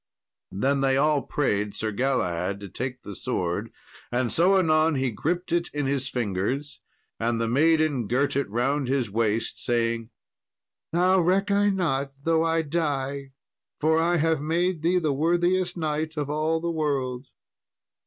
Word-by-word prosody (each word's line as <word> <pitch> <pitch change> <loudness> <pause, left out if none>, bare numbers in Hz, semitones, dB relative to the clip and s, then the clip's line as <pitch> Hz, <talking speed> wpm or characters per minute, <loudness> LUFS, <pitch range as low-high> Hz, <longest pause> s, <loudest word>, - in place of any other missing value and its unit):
"] - - -65
Then 135 +7 0
they 135 -1 +2
all 150 0 +3
prayed 105 -8 -1
Sir 110 0 -2
Galahad 100 -6 -1
to 100 - -8
take 125 +4 -5
the 100 - -8
sword, 90 +7 -2 0.4
and 120 -1 0
so 180 - +4
anon 160 -3 +3
he 130 -2 0
gripped 175 - -2
it 170 0 0
in 145 -1 -1
his 135 -1 -1
fingers; 125 +6 -2 0.4
and 115 0 0
the 115 - 0
maiden 150 -1 +2
girt 130 +5 +1
it 140 -6 0
round 130 +5 0
his 130 -5 0
waist, 110 +1 -1
saying, 115 -1 0 0.8
"Now 180 +3 +3
reck 190 +4 +2
I 205 +1 +3
not 140 -8 -1
though 165 0 +2
I 165 0 +1
die, 140 -3 -2 0.5
for 160 +1 +3
I 170 +1 +2
have 160 -1 +1
made 170 +2 0
thee 175 +3 +2
the 155 -5 +1
worthiest 175 +5 +1
knight 155 0 -2
of 145 -1 -2
all 155 +2 0
the 170 +1 -2
world." 135 -5 -2
145 Hz, 160 wpm, -25 LUFS, 125-165 Hz, 0.8 s, so